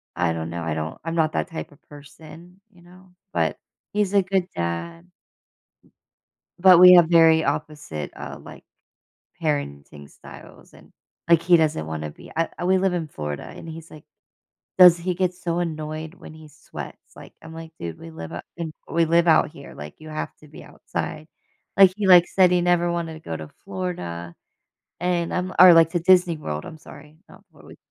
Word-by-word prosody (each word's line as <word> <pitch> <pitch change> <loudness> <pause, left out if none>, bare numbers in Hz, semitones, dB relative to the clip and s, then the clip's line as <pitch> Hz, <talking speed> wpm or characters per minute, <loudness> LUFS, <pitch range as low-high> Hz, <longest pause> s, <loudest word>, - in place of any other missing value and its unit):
I 85 -2 0
don't 80 0 -5
know. 85 0 -5
I 80 -1 -2
don't 80 0 -5
I'm 165 +1 -4
not 155 -2 +1
that - - -2
type 165 - -7
of 145 - -21
person, 160 +5 -15
you 180 -3 -22
know? 180 +1 -19 0.2
But, - - 0 0.4
he's 205 -2 0
a 200 - +5
good 190 -1 -1
dad 85 0 -5 1.5
but 180 -1 +7
we 180 0 +10
have 175 -2 +7
very 165 -1 +5
opposite, 145 - -4
uh, - - -8
like, - - -13 0.8
parenting 70 - -4
styles - - -15
and, - - -18 0.4
like, 170 -1 +4
he 175 0 +5
doesn't 150 - 0
wanna 80 -1 -5
be - - -15
I 165 +1 -3
we 190 +1 +3
live 190 -1 0
in 165 -3 -3
Florida, 75 - -6
and - - -11
he's 165 0 -10
like 155 - -14 0.7
does 180 -2 +9
he 180 +1 -3
get 185 0 0
so 175 -2 -4
annoyed 155 -1 -5
when 160 - -13
he 155 -1 -14
sweats. 150 +1 -11
Like, - - -14
I'm 160 - -12
like, 160 0 -10
"Dude, 85 -1 -6
we 80 - -11
live 80 0 -9
up 85 - -8
in 165 -2 -5 0.2
we 165 0 +1
live 170 +1 +2
out 160 -1 +4
here. 140 -3 -13
Like, 75 0 -11
you 155 - -12
have 155 0 -6
to 150 - -18
be 150 - -13
outside." 155 - -6 0.5
Like, 195 -2 +6
he, 210 - -2
like, 180 -2 +7
said 185 -2 +3
he 180 -1 +2
never 175 0 +1
wanted 170 -1 -3
to - - -11
go 80 - -6
to 80 -1 -8 0.2
Florida 90 - -6 0.7
and 175 -1 -1
I'm 180 0 -2
li - - -9
or, 180 -1 +10
like, 165 -1 +5
to 175 - -1
Disney 180 -1 +4
World, 75 - -6
I'm 160 - -10
sorry. 150 +1 -15
Not - - -17
Flori - - -16
160 Hz, 195 wpm, -23 LUFS, 140-175 Hz, 1.5 s, we